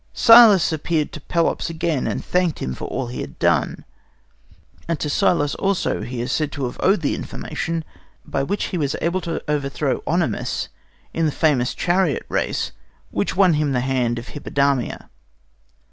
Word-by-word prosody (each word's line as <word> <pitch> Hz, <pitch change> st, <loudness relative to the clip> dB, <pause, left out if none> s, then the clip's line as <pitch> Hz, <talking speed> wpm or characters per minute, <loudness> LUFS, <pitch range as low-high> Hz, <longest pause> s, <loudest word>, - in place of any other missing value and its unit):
Cillas 225 Hz, -8 st, +7 dB
appeared 155 Hz, 0 st, -1 dB
to 155 Hz, -, -9 dB
Pelops 170 Hz, +3 st, 0 dB
again, 165 Hz, -4 st, -1 dB
and -, -, -3 dB
thanked 180 Hz, -3 st, +1 dB
him 65 Hz, -, -3 dB
for -, -, -6 dB
all 130 Hz, 0 st, -3 dB
he 120 Hz, +1 st, -5 dB
had -, -, -8 dB
done, -, -, +1 dB, 1.0 s
and 165 Hz, -3 st, -1 dB
to 150 Hz, -, -2 dB
Cillas 145 Hz, -5 st, +2 dB
also 195 Hz, -1 st, -1 dB
he 120 Hz, -1 st, -4 dB
is 120 Hz, -, -3 dB
said 150 Hz, -2 st, 0 dB
to 140 Hz, -2 st, -2 dB
have 125 Hz, -, -5 dB
owed 190 Hz, -1 st, +3 dB
the 145 Hz, -, 0 dB
information 165 Hz, 0 st, -4 dB, 0.4 s
by 135 Hz, -, -2 dB
which 200 Hz, +9 st, -1 dB
he 180 Hz, -, 0 dB
was 140 Hz, -3 st, -1 dB
able 175 Hz, +3 st, 0 dB
to 165 Hz, -1 st, -4 dB
overthrow 145 Hz, -2 st, -1 dB
OEnomaus -, -, -1 dB, 0.4 s
in 165 Hz, -1 st, +1 dB
the -, -, 0 dB
famous 140 Hz, -6 st, +1 dB
chariot 175 Hz, -5 st, +1 dB
race -, -, -1 dB, 0.4 s
which 100 Hz, -, -1 dB
won 190 Hz, -3 st, +5 dB
him 150 Hz, -2 st, 0 dB
the 125 Hz, -, +1 dB
hand 125 Hz, -2 st, 0 dB
of 115 Hz, -1 st, -7 dB
Hippodamia. 140 Hz, 0 st, -1 dB
150 Hz, 170 wpm, -21 LUFS, 135-170 Hz, 1.0 s, Cillas